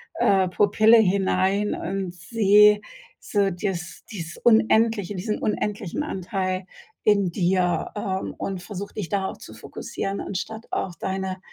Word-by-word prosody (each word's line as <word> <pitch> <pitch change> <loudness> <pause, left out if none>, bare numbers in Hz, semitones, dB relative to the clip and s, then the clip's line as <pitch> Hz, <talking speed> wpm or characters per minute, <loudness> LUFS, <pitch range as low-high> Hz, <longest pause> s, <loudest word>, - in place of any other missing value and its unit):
äh, 190 -2 +3
Pupille 215 +4 +5
hinein, 195 0 +2
und 190 -2 -3
seh 210 +2 +4 0.4
so 200 -2 +1
dieses 175 -1 -4
dieses 170 -4 -6
unendliche, 220 -3 +3
diesen 210 +4 -2
unendlichen 210 - -2
Anteil 185 - -3 0.4
in 200 -3 +4
dir, 180 -1 +1
ähm, 190 -2 -3
und 190 -2 -4
versuch 200 0 -6
dich 200 -7 -5
darauf 195 -1 -2
zu - - -12
fokussieren 195 0 -5
anstatt 220 +4 -5
auf 175 -3 -2
deine 190 0 -3
195 Hz, 125 wpm, -24 LUFS, 185-210 Hz, 0.4 s, Pupille